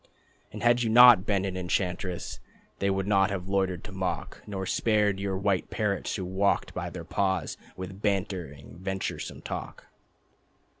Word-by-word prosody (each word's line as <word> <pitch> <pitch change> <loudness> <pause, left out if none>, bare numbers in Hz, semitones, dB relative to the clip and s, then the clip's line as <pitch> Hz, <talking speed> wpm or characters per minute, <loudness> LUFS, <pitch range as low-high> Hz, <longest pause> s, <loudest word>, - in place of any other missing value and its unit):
And - - -7
had 120 0 +4
you 115 - +1
not 120 -3 +8
been 100 -2 +1
an 95 -1 -3
enchantress 90 +1 -2 0.4
They 100 - +1
would 95 0 0
not 95 -1 +3
have 95 -2 -4
loitered 95 -2 0
to 105 - -9
mock 95 -4 -3
Nor 95 -2 -4
spared 105 -1 +2
your 100 -1 -2
white 100 -2 0
parrots 105 -2 -1
who 95 - -3
walked 95 +2 +1
by - - -3
their - - -8
paws 95 -5 0 0.2
With 95 +1 -7
bantering 90 -8 -3
venturesome 95 +1 -4
talk. - - -6
95 Hz, 155 wpm, -28 LUFS, 95-100 Hz, 0.4 s, not